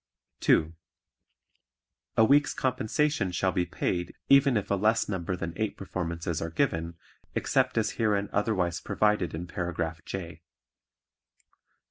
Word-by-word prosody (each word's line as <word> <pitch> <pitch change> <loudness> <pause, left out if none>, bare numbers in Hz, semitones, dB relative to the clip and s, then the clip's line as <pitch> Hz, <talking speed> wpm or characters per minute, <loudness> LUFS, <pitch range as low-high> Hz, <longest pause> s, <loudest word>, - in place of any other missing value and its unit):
(2) 80 +1 +3 1.4
A 110 - +7
week's 145 +5 +4
compensation 130 -2 0
shall 95 +1 +1
be 90 0 0
paid 90 -1 -2
even 140 -3 +6
if 100 - -3
a - - +4
less 110 +3 +2
number 95 -2 -2
than 85 -2 -4
eight 110 -1 -2
performances 85 -4 -3
are 80 - -2
given, 85 - -1 0.4
except - - +1
as - - +2
herein 105 -3 +1
otherwise 95 -5 0
provided 105 -6 +1
in 85 +2 -5
Paragraph 85 -2 -3
J. 90 -3 -6
95 Hz, 125 wpm, -28 LUFS, 85-110 Hz, 1.4 s, A